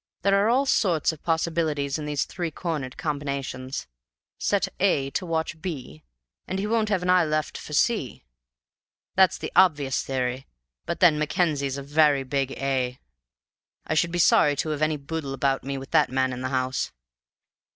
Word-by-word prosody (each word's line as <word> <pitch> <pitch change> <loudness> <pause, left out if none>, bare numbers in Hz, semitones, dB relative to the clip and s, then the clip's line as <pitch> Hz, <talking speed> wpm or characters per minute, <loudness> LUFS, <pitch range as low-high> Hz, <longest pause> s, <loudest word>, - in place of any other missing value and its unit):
There 200 0 +4
are 215 - +3
all 260 +4 +3
sorts 180 - +2
of 160 - -11
possibilities 160 -3 0
in 150 - -5
these 145 -1 0
three 170 0 -4
cornered 150 -5 -4
combinations. 140 -3 -4 0.5
Set 200 -1 +1
A 140 -8 +2
to 180 - -3
watch 160 0 -2
B, 135 - -6 0.5
and 190 - -2
he 195 - -1
won't 220 0 +1
have 190 -4 0
an 180 - -1
eye 180 -1 +5
left 155 -1 -1
for 150 - -8
C. 145 - 0 0.9
That's 190 -1 +4
the - - -6
obvious 145 -8 +4
theory, 130 0 -2 0.4
but 170 - -3
then 160 -4 +6
Mackenzie's 150 -3 0
a 140 - -5
very 145 -1 +3
big 135 0 -1
A. 130 -2 -1 0.9
I - - -1
should 170 +2 +2
be 175 - -2
sorry 150 -3 +5
to 155 - -2
have 150 -1 -3
any 155 0 +1
boodle 140 -1 -5
about 135 0 0
me 140 0 -3
with 135 0 -9
that - - +4
man 130 0 0
in 125 - -6
the 130 - -2
house. 130 -1 -1
150 Hz, 175 wpm, -25 LUFS, 135-170 Hz, 0.9 s, then